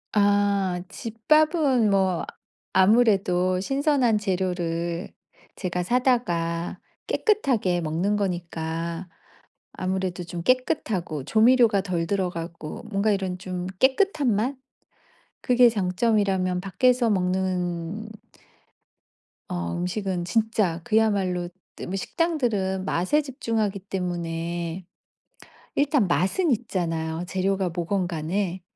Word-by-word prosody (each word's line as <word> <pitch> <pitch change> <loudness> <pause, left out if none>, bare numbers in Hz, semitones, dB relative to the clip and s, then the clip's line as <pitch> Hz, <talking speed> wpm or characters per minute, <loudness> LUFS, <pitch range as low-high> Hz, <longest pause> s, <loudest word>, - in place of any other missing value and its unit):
아 200 -3 +2
집밥은 270 - +2
뭐 190 -3 +2 0.5
아무래도 190 -3 +3
신선한 270 -1 +2
재료를 175 -3 -2 0.4
제가 180 -2 -2
사다가 175 -8 0 0.3
깨끗하게 245 - +1
먹는 170 +6 0
거니까 170 -2 -3 0.6
아무래도 185 -1 -2
좀 170 0 -6
깨끗하고 190 - 0
조미료가 225 - +4
덜 175 -3 -2
들어가고 170 -3 -4
뭔가 200 +1 +1
이런 190 -2 -2
좀 180 -1 -5
깨끗한 275 - +3
맛? 250 +7 0 0.9
그게 245 -1 +5
장점이라면 190 -2 +1
밖에서 245 +5 +2
먹는 185 +1 -1 1.4
어 85 -1 -3
음식은 180 -1 -2
진짜 215 -5 0
그야말로 200 -6 +1 0.5
식당들은 210 - -1
맛에 185 - +1
집중하기 225 -7 -2
때문에 175 -2 -4 0.9
일단 285 - +2
맛은 230 - +1
있잖아요, 170 -7 -2
재료가 190 0 0
뭐건 175 +2 -1
간에. 180 +3 -2
190 Hz, 220 characters per minute, -25 LUFS, 175-225 Hz, 1.4 s, 그게